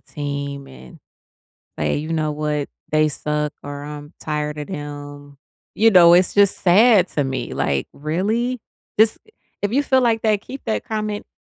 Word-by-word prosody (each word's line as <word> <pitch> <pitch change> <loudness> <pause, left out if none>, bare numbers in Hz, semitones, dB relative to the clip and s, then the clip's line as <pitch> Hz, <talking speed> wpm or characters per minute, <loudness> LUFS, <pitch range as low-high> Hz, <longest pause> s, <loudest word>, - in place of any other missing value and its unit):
team 140 -1 -5
and 65 -1 -14 0.8
say, 75 0 0
"You 155 +3 -4
know 155 -1 0
what? 150 -1 -2 0.2
They 155 0 +3
suck," 150 0 -2
or 145 0 -7
"I'm 150 +1 -9
tired 150 -1 -3
of 150 - -6
them," 145 -3 -8 0.4
you 225 +1 +5
know, 175 -4 +8
it's 180 0 +4
just 200 -1 +4
sad 195 +1 +5
to 145 - +3
me. 130 -2 -4
Like, 70 -2 -1
really? 215 - -1 0.4
This 220 +1 +4 0.4
if 205 +2 -1
you 285 +3 +3
feel 265 -2 +3
like 230 -3 +1
that, 215 -2 +2
keep 270 +1 -9
that 220 - -1
comment 215 -1 -3
155 Hz, 165 wpm, -21 LUFS, 145-210 Hz, 0.8 s, know